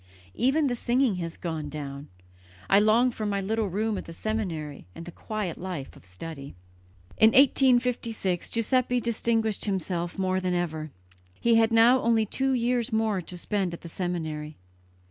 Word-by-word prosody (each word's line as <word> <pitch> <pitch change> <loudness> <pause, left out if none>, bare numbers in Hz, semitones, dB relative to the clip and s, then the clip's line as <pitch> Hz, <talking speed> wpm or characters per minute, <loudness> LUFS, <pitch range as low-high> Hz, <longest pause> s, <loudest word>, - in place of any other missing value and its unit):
"Even 275 +5 +2
the 250 -3 0
singing 240 -3 +1
has 165 -2 -5
gone 160 -4 -4
down. 140 -1 -7 0.6
I 195 - +5
long 225 +4 +4
for 225 - -6
my 200 -1 0
little 215 +2 -1
room 210 +2 -1
at - - -9
the 165 - -9
seminary 165 - -4
and 165 - -8
the 175 - -8
quiet 210 -3 -5
life 175 -7 -6
of - - -16
study." 140 - -8 0.6
In 220 - +8
1856 245 -8 +3
Giuseppe 250 +2 +1
distinguished 225 -2 0
himself 180 -3 -2
more 185 -1 0
than 180 -1 -1
ever, 160 -3 -2 0.5
He 235 -1 +4
had 225 0 +3
now 230 +3 +6
only 225 -1 +2
two 265 +5 -1
years 240 -1 0
more 220 -3 +1
to 180 +1 -7
spend 185 -1 -2
at - - -14
the 170 - -9
seminary. 160 -4 -4
205 Hz, 165 wpm, -27 LUFS, 170-230 Hz, 0.6 s, In